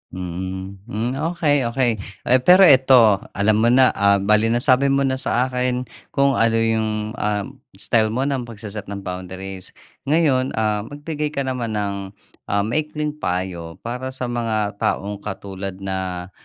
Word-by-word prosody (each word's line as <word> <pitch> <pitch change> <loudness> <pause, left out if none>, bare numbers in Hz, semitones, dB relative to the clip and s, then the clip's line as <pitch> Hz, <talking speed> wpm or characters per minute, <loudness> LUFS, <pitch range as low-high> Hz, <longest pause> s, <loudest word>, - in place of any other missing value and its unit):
Mm. 95 +2 -5
Hmm, 115 +1 -2 0.2
okey, 145 -6 +2
okey. 115 -2 0 0.2
Eh, 130 +1 +4
pero 180 +8 +7
eto, 130 - +6 0.2
alam 105 +2 +2
mo 115 - +3
na, 125 +2 +5
ah, 100 0 +3
bale 105 +2 +3
nasabi 125 +3 +3
mo 140 0 +2
na 130 -1 0
sa 130 0 0
akin, 125 0 -1 0.3
kung 140 0 +4
ano 115 -3 +2
'yong, 115 -1 +1 0.3
ah, 105 -1 0 0.3
style 110 -2 +2
mo 120 +5 -1
ng 135 -3 -2
pagse-set 105 -2 -8
ng 100 0 -6
boundaries. 95 +1 -7 0.3
Ngayon, 140 -4 +2
ah, 105 -1 0
magbigay 150 +1 -4
ka 145 -2 -3
naman 125 -4 -3
ng, 100 -1 -1 0.5
ah, 100 0 +1
maikling 150 +5 -2
payo 90 - -3
para 125 +3 -4
sa 125 -2 -4
mga 110 -4 -2
taong 105 -2 -1
katulad 95 -1 -6
na 95 -1 -4
115 Hz, 155 wpm, -21 LUFS, 100-130 Hz, 0.5 s, pero